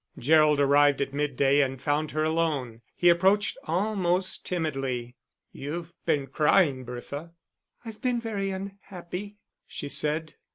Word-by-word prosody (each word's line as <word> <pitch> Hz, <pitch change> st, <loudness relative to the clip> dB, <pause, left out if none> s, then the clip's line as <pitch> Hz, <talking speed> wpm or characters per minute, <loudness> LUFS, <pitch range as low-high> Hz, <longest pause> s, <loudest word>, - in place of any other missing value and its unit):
Gerald 155 Hz, +1 st, +4 dB
arrived 145 Hz, 0 st, +4 dB
at 140 Hz, -1 st, -2 dB
midday 140 Hz, -1 st, +2 dB
and 135 Hz, -1 st, -1 dB
found 150 Hz, +2 st, 0 dB
her 155 Hz, 0 st, -1 dB
alone. 155 Hz, -8 st, -1 dB
He 175 Hz, -, +2 dB
approached 190 Hz, +4 st, +4 dB
almost 185 Hz, 0 st, 0 dB
timidly. 135 Hz, -8 st, -3 dB, 0.4 s
"You've 165 Hz, +4 st, -6 dB
been 140 Hz, -2 st, +2 dB
crying, 150 Hz, 0 st, +2 dB
Bertha." 140 Hz, +7 st, -7 dB, 0.5 s
"I've 225 Hz, -2 st, -9 dB
been 250 Hz, -2 st, 0 dB
very 210 Hz, -4 st, -3 dB
unhappy," 195 Hz, 0 st, -7 dB, 0.3 s
she 145 Hz, -, -6 dB
said. 155 Hz, +2 st, 0 dB
155 Hz, 125 wpm, -27 LUFS, 140-185 Hz, 0.5 s, Gerald